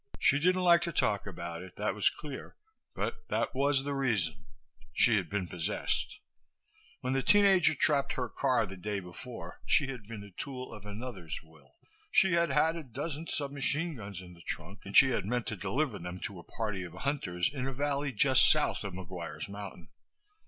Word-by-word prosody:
She 140 - +4
didn't 185 +3 +3
like 170 -1 +6
to 170 - -1
talk 105 -10 +1
about 85 -3 -6
it, 95 -1 -11
that - - -1
was - - +3
clear, 145 -3 -8 0.4
but 455 0 -3
that - - -1
was 135 0 +2
the 145 0 -2
reason. 95 - 0 0.4
She - - +5
had - - -2
been 100 -3 -2
possessed. 85 -1 -1 0.8
When 130 +1 -1
the 135 - +2
teen 205 +9 +5
ager 180 -5 +5
trapped 140 0 +3
her 125 -1 -2
car 125 0 +1
the 95 -1 -9
day 100 +2 -3
before 90 0 -9
she 140 - +4
had 115 -6 -9
been 110 -2 -7
the 100 0 -11
tool 130 +6 -6
of 105 -1 -10
another's 105 -7 -5
will. 75 -5 -21 0.3
She 190 -2 +4
had 170 -1 +3
had 155 +4 +3
a 165 - -4
dozen 145 +5 -5
sub 140 -2 -1
machine 150 +4 0
guns 100 -5 -7
in 90 -1 -12
the 85 - -15
trunk 100 +4 -6
and 100 - +2
she 135 -1 +8
had 110 -6 0
meant 120 +1 0
to 110 - -3
deliver 105 +4 -1
them 90 +1 -6
to 95 -3 -5
a - - -11
party 105 -4 -3
of 90 - -8
hunters 100 -10 -1
in 130 -2 -2
a - - -2
valley 140 +1 -1
just 130 +3 +6
south - - +2
of 100 -2 -5
McGuire's 85 -4 -6
Mountain. 100 -4 -8
120 Hz, 200 wpm, -31 LUFS, 95-140 Hz, 0.8 s, she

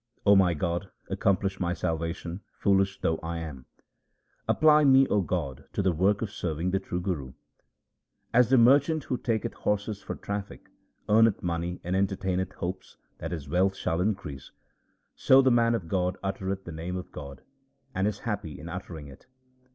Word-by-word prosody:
O 100 0 +7
my 90 -3 +4
God, 85 +4 -2 0.2
accomplish 95 0 +1
my 90 -1 0
salvation, 85 +3 -3 0.2
foolish 95 -1 +2
though 80 - +1
I 85 +1 -4
am! 75 -6 -7 0.8
Apply 155 -1 +5
me, 135 -1 +6
O 105 - +3
God, 80 -8 -3
to 100 - 0
the 95 - +3
work 95 +6 +2
of 105 - -4
serving 85 -3 -2
the 95 - +1
true 90 -2 -4
Guru. 80 -9 -3 1.0
As 120 0 +5
the 130 - +5
merchant 140 +6 +5
who 125 - -2
taketh 115 -3 -1
horses 105 0 -2
for - - -5
traffic, 100 0 -6 0.4
Earneth 110 0 +4
money 85 0 -2
and 90 +2 -1
entertaineth 95 -1 -1
hopes 95 +1 -6 0.2
that 80 - -4
his 80 -5 -5
wealth 95 +5 +2
shall 80 -2 -1
increase; 95 - -3 0.7
So 130 - +5
the 130 -1 +5
man 115 -1 +4
of 90 -7 -4
God 90 0 0
uttereth 95 0 -3
the 85 - -7
name 85 +3 -5
of 90 - -6
God, 70 -3 -9 0.5
and 95 -1 +1
is 105 -2 -2
happy 100 - -4
in 80 - -8
uttering 85 -3 -7
it. 70 0 -15
95 Hz, 170 wpm, -28 LUFS, 85-105 Hz, 1.0 s, O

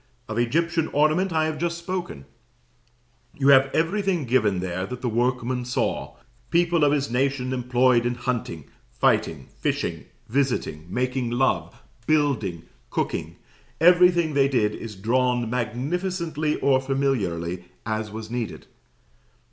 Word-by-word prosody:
Of 110 +1 -3
Egyptian 165 +6 +1
ornament 155 +6 +2
I 160 -1 +2
have 155 -1 -3
just 170 0 -1
spoken. 170 - -5 1.1
You 140 -1 +3
have 135 0 +7
everything 180 0 0
given 110 -6 +2
there 95 +1 -3
that 125 +2 -7
the - - 0
workman 125 +2 0
saw; 125 - -2 0.3
people 170 -1 +2
of 145 - +5
his 140 -3 0
nation 130 0 0
employed 125 -1 +3
in 120 0 -1
hunting, 120 - -3 0.2
fighting, 65 +3 0
fishing, - - -2 0.2
visiting, 120 - -1
making 125 +3 -1
love, 120 - 0 0.2
building, 135 - +1 0.3
cooking - - -3 0.4
everything 175 -2 +5
they 140 -1 +4
did 115 -6 +1
is 110 -1 -7
drawn, 120 +4 +1
magnificently 150 - -2
or 135 -1 +3
familiarly, 95 -11 -1 0.2
as 110 0 -2
was 110 +1 -8
needed. 120 -2 -4
130 Hz, 125 wpm, -24 LUFS, 115-155 Hz, 1.1 s, have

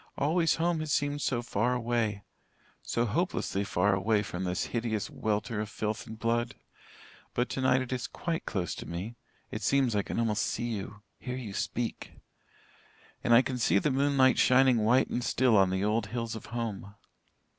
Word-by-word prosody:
Always 165 +3 +2
home 170 0 +1
has 155 -1 -3
seemed 145 +1 0
so 120 -4 0
far 120 +3 0
away 115 -4 -1 0.6
so 120 - 0
hopelessly 120 - -1
far 100 0 +2
away 105 +2 +2
from 95 -2 -4
this 90 0 -1
hideous 115 -3 -1
welter 105 0 -1
of 105 - -4
filth 110 -1 -3
and 110 - -8
blood. 120 +1 0 0.8
But 120 +1 +1
tonight 130 -1 +2
it 130 - -5
is 120 -3 -3
quite 170 -1 -4
close 90 -6 -2
to - - -8
me 90 +7 -5 0.4
it 110 - -4
seems 135 +3 +2
to 105 - 0
me - - +3
I - - 0
can - - -5
almost 110 -2 +1
see 120 +1 -1
you 105 0 -6 0.2
hear 125 -1 -5
you 115 -6 -6
speak. 120 +4 -3 1.1
And - - +1
I 120 +2 +8
can 130 -2 -3
see 115 - +3
the 140 +9 +1
moonlight 135 -1 +3
shining 130 -1 +5
white 120 +5 +3
and 120 - -1
still 125 -2 +3
on 95 -2 +5
the 95 +1 -1
old 105 0 +1
hills 115 0 -3
of 110 - -8
home. 105 -4 -5
115 Hz, 190 wpm, -29 LUFS, 105-130 Hz, 1.1 s, I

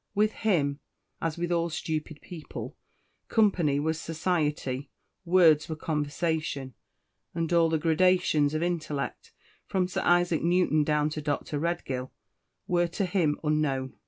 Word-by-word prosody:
With 210 +1 +3
him, 150 -12 0 0.4
as 165 -1 -2
with 175 0 -2
all 170 0 +1
stupid 155 -1 -4
people, 165 -4 -8 0.5
company 180 -10 +2
was 160 +2 -1
society, 150 -5 -1 0.4
words 170 -4 +5
were 160 - -2
conversation 150 -2 -2 0.6
and 165 0 -1
all 165 -1 +4
the 160 - +1
gradations 160 -2 +2
of 155 - 0
intellect, 155 -6 -3 0.4
from 185 -2 0
Sir 180 - -2
Isaac 175 -2 +3
Newton 170 -3 +3
down 150 0 +1
to 155 - -4
Dr. 145 0 -2
Redgill, 135 -6 -3 0.6
were 175 -1 +2
to 170 +4 -2
him 175 -5 +1
unknown. 145 -4 0
160 Hz, 130 wpm, -28 LUFS, 150-175 Hz, 0.6 s, words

